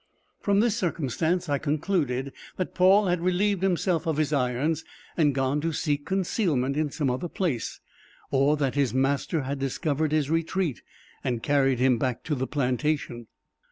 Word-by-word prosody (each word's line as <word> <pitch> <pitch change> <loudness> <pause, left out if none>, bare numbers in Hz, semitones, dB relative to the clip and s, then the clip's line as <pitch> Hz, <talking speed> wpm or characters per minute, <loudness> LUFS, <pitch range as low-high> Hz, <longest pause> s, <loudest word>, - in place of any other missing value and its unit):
From 200 0 +2
this 230 -2 +2
circumstance 170 - -1
I 145 -2 0
concluded, 145 -4 -1 0.2
that 185 - -3
Paul 190 +3 +5
had 175 -2 0
relieved 185 +2 +1
himself 180 -3 +1
of 160 -2 0
his 155 -1 +1
irons 140 +4 0 0.3
and 145 -5 +2
gone 135 +2 0
to 165 +2 -1
seek 145 -2 -1
concealment 170 - 0
in 155 0 0
some 140 -2 -1
other 130 +8 -3
place, 160 - -2 0.5
or 140 +2 +3
that 140 -3 0
his 140 -3 0
master 140 +3 +1
had 135 +1 -3
discovered 145 +2 -1
his 155 -1 +1
retreat 165 - -1 0.4
and 120 -3 -2
carried 135 -3 +2
him 125 -1 +3
back 125 -2 -1
to 155 - -2
the 130 -2 -1
plantation. 130 -3 -1
150 Hz, 160 wpm, -26 LUFS, 135-175 Hz, 0.5 s, Paul